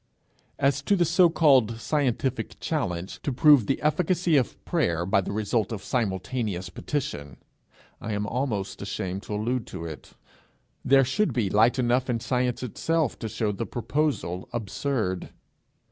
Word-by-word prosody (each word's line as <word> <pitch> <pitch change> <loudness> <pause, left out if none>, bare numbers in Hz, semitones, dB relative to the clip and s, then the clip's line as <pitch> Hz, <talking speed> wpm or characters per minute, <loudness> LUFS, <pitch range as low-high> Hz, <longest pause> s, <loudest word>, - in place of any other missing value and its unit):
As 140 0 +2
to 200 +8 +2
the 175 -2 +3
so 175 +2 +5
called 130 -9 +4
scientific 130 -1 -1
challenge 95 - -3
to 140 - -2
prove 140 -3 +5
the 135 - 0
efficacy 170 +2 +2
of 130 -4 +1
prayer 85 0 0
by 95 +1 +3
the 95 - -5
result 110 +1 0
of 110 -4 -5
simultaneous 105 -3 -2
petition, 75 - -4 0.6
I 110 - -3
am 105 0 -1
almost 105 -6 -2
ashamed 95 -1 -4
to 105 - -5
allude 115 +3 -1
to 85 -3 -7
it. 80 -2 -9 0.7
There 135 0 +5
should 170 +12 0
be 105 -6 0
light 115 +4 +4
enough 125 +1 +1
in 120 -2 0
science 125 0 -1
itself 155 +4 -1
to 110 - -4
show 105 0 -1
the 100 - -4
proposal 120 - -2
absurd. 110 -3 -2
120 Hz, 150 wpm, -26 LUFS, 100-140 Hz, 0.7 s, so